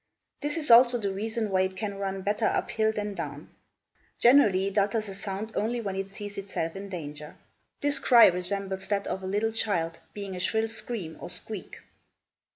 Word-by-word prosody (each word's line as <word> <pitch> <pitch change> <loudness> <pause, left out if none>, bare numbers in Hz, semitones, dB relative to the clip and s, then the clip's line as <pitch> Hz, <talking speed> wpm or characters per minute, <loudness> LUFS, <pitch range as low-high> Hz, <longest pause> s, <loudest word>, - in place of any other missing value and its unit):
This 295 +1 -1
is 305 -6 +2
also 245 +1 +8
the 200 -4 -2
reason 220 +1 -2
why 185 -1 +3
it 190 0 -1
can 200 -1 -4
run 195 -1 -3
better 210 +3 0
up - - -1
hill 220 -1 +2
than 210 -1 -3
down. 150 -4 -6 0.7
Generally 220 -7 +5
it 200 - -8
utters 210 +2 0
a - - -5
sound 200 +2 -3
only 235 +3 -1
when 200 -4 -3
it 195 0 -3
sees 205 +1 -6
itself 190 -4 -4
in 200 +1 -7
danger. 150 -4 -7 0.5
This 290 0 +3
cry 240 -3 +7
resembles 190 +1 -1
that 200 0 0
of 190 - -3
a 185 - -5
little 210 +3 0
child, 170 -7 -1 0.2
being 200 -2 -5
a - - -5
shrill 220 +4 0
scream 215 -6 -5
or - - -6
squeak. - - -6
200 Hz, 190 wpm, -28 LUFS, 190-220 Hz, 0.7 s, also